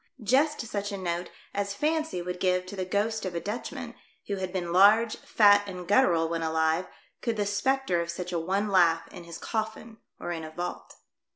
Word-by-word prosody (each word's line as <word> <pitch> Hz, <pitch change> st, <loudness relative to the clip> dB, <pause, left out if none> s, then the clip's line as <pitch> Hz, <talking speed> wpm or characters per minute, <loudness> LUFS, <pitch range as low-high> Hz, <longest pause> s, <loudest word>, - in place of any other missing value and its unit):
just 280 Hz, +7 st, +3 dB
such 205 Hz, -3 st, -4 dB
a 200 Hz, -, -3 dB
note 175 Hz, -1 st, -3 dB, 0.2 s
as 200 Hz, 0 st, -2 dB
fancy 310 Hz, -, -1 dB
would 180 Hz, 0 st, -5 dB
give 185 Hz, 0 st, +1 dB
to 185 Hz, -, -8 dB
the 185 Hz, -1 st, -2 dB
ghost 215 Hz, +4 st, -1 dB
of 185 Hz, -2 st, -4 dB
a -, -, 0 dB
Dutchman, 210 Hz, +7 st, -5 dB, 0.3 s
who 200 Hz, -, -3 dB
had 185 Hz, -1 st, -3 dB
been 175 Hz, -2 st, -3 dB
large, 215 Hz, +4 st, +6 dB
fat 205 Hz, -2 st, +5 dB
and 180 Hz, -2 st, -7 dB
guttural 180 Hz, -7 st, +4 dB
when 165 Hz, 0 st, -2 dB
alive, 160 Hz, +2 st, +1 dB, 0.3 s
could 230 Hz, -3 st, -1 dB
the 205 Hz, -, +1 dB
spectre 205 Hz, -2 st, +1 dB
of 170 Hz, -, -5 dB
such 180 Hz, +1 st, -4 dB
a 170 Hz, -, +1 dB
one 195 Hz, +5 st, 0 dB
laugh 170 Hz, -4 st, +4 dB
in 175 Hz, -, -11 dB
his 170 Hz, -1 st, -8 dB
coffin 220 Hz, 0 st, -4 dB, 0.2 s
or -, -, -4 dB
in 165 Hz, -2 st, -4 dB
a 155 Hz, -, -6 dB
vault. 175 Hz, +3 st, -6 dB
190 Hz, 200 wpm, -28 LUFS, 175-215 Hz, 0.3 s, large